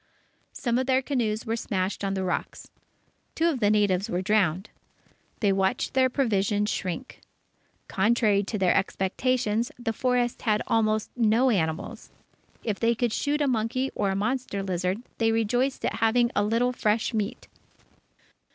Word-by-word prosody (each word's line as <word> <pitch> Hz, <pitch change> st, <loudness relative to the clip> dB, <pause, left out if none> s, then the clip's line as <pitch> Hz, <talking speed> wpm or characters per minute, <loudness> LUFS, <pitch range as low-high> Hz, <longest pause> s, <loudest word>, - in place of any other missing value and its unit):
Some 240 Hz, -1 st, 0 dB
of 260 Hz, -, -2 dB
their 260 Hz, 0 st, +2 dB
canoes 230 Hz, -6 st, -1 dB
were 225 Hz, 0 st, -1 dB
smashed 195 Hz, -4 st, -2 dB
on 195 Hz, 0 st, -1 dB
the 190 Hz, -, -2 dB
rocks. 180 Hz, -1 st, -4 dB, 0.6 s
Two 330 Hz, -, +2 dB
of 305 Hz, -7 st, 0 dB
the 205 Hz, -3 st, +3 dB
natives 205 Hz, -2 st, +2 dB
were 180 Hz, +1 st, -1 dB
drowned. 195 Hz, -2 st, +1 dB, 0.7 s
They 200 Hz, -3 st, +3 dB
watched 195 Hz, +5 st, 0 dB
their 260 Hz, -1 st, +3 dB
provisions 210 Hz, -5 st, +1 dB
shrink. 190 Hz, +8 st, -4 dB, 0.7 s
Contrary 210 Hz, 0 st, +2 dB
to 215 Hz, -, -3 dB
their 185 Hz, -3 st, +3 dB
expectations, 225 Hz, +4 st, 0 dB
the 240 Hz, -2 st, -3 dB
forest 245 Hz, 0 st, 0 dB
had 215 Hz, -2 st, +1 dB
almost 215 Hz, -1 st, +1 dB
no 240 Hz, +2 st, +3 dB
animals. 160 Hz, -6 st, -2 dB, 0.5 s
If 215 Hz, -4 st, -2 dB
they 235 Hz, 0 st, +2 dB
could 235 Hz, -1 st, 0 dB
shoot 295 Hz, +1 st, 0 dB
a 290 Hz, -, +2 dB
monkey 250 Hz, +2 st, 0 dB
or 200 Hz, -, 0 dB
a 190 Hz, -, -1 dB
monster 210 Hz, -1 st, -2 dB
lizard, 185 Hz, +3 st, -2 dB, 0.2 s
they 225 Hz, -1 st, +3 dB
rejoiced 245 Hz, +4 st, 0 dB
at 225 Hz, -, -1 dB
having 235 Hz, +2 st, +2 dB
a 205 Hz, -, +3 dB
little 230 Hz, +4 st, +1 dB
fresh 220 Hz, +1 st, 0 dB
meat. 215 Hz, +2 st, -3 dB
220 Hz, 155 wpm, -26 LUFS, 200-245 Hz, 0.7 s, the